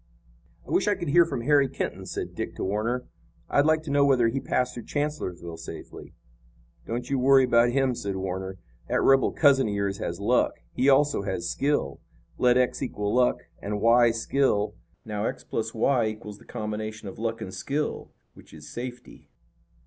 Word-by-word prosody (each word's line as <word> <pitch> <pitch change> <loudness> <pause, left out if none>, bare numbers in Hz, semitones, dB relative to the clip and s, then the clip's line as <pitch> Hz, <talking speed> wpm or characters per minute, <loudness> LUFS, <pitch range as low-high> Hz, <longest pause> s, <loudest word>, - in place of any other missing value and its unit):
"I - - -8
wish - - +2
I 205 - +3
could 175 -5 -4
hear 170 +4 +6
from 135 -6 -4
Harry 140 +1 +3
Kenton," 95 -6 -4
said - - -5
Dick - - -5
to - - -4
Warner. 115 +6 -1 0.5
"I'd 145 +2 +4
like 155 0 +3
to 155 - -5
know 140 0 +4
whether 130 -5 +4
he 135 - -2
passed 125 -1 -1
through 120 -3 -8
Chancellorsville 90 - -3
safely." 80 - -10 0.7
"Don't 120 +1 -3
you 135 - +1
worry 135 +1 +6
about 120 -1 +4
him," 135 0 +1
said 100 -4 -4
Warner. 95 0 -4 0.3
"That - - +1
rebel 135 -1 +4
cousin 135 -5 +4
of 105 - -2
yours 100 -1 -1
has - - -4
luck. - - +2 0.2
He 135 - +2
also 145 -3 +4
has 95 -3 -3
skill. 140 - 0 0.4
Let 125 0 +4
x 125 +2 +1
equal 105 -6 -2
luck 125 0 +3 0.2
and 105 0 -3
y 120 +2 +5
skill. 115 -3 +1 0.3
Now 105 -1 -3
x - - -3
plus 110 0 -3
y 120 0 +2
equals 105 -1 -7
the - - -18
combination 110 0 -5
of 95 - -9
luck 115 0 -2
and 95 - -7
skill, 140 +10 -3 0.2
which - - -16
is 75 -1 -12
safety. 125 0 -8
120 Hz, 185 wpm, -26 LUFS, 105-135 Hz, 0.7 s, hear